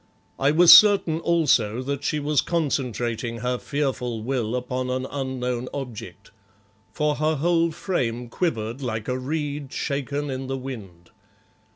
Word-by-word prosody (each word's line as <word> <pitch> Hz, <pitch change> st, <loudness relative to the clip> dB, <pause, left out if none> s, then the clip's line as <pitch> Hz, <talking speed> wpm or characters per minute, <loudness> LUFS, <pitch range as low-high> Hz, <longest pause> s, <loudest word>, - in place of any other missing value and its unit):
I 135 Hz, -, +3 dB
was 165 Hz, +3 st, +9 dB
certain, 200 Hz, -6 st, +5 dB
also, 130 Hz, -10 st, +2 dB
that 140 Hz, +1 st, -3 dB
she 150 Hz, -, 0 dB
was 145 Hz, -1 st, +1 dB
concentrating 120 Hz, -7 st, -2 dB
her 125 Hz, 0 st, -1 dB
fearful 125 Hz, -6 st, -2 dB
will 120 Hz, -2 st, -1 dB
upon 125 Hz, 0 st, -3 dB
an 130 Hz, 0 st, -2 dB
unknown 125 Hz, -3 st, -3 dB
object, 125 Hz, -6 st, -8 dB, 0.6 s
for 150 Hz, -1 st, 0 dB
her 155 Hz, +1 st, +1 dB
whole 170 Hz, +2 st, +2 dB
frame 125 Hz, -9 st, -2 dB
quivered 120 Hz, -4 st, -2 dB
like 110 Hz, -4 st, -3 dB
a 130 Hz, 0 st, -1 dB
reed 145 Hz, 0 st, -4 dB
shaken 140 Hz, 0 st, -3 dB
in 130 Hz, 0 st, -4 dB
the 135 Hz, 0 st, -3 dB
wind. 100 Hz, -10 st, -9 dB
130 Hz, 140 wpm, -24 LUFS, 125-150 Hz, 0.6 s, was